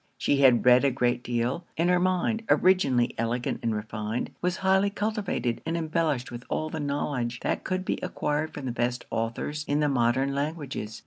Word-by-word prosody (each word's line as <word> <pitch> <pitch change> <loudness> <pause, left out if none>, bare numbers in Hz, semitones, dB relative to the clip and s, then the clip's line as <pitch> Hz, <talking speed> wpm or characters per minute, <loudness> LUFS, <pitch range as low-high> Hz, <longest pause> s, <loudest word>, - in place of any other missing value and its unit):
She 140 - +1
had 130 -4 +5
read 125 +1 +7
a 140 - +4
great 125 -1 0
deal; 120 +7 -1
and 170 +2 +2
her 180 0 +4
mind, 185 +5 +1
originally 135 -10 +3
elegant 120 +2 -1
and 115 -2 0
refined, 110 +2 -3
was 180 +1 0
highly 190 +1 +4
cultivated, 205 - -2
and 165 +1 -2
embellished 155 -6 -1
with 120 0 -7
all 155 0 -2
the 160 - -4
knowledge 140 -4 -2
that - - -1
could 185 0 -2
be - - -1
acquired 155 -3 -2
from 145 - -7
the 125 - -1
best 120 +1 -2
authors 120 +7 -2
in 145 +1 +1
the 150 - +2
modern 130 +1 +2
languages. 140 -7 -4
140 Hz, 185 wpm, -27 LUFS, 120-170 Hz, -, read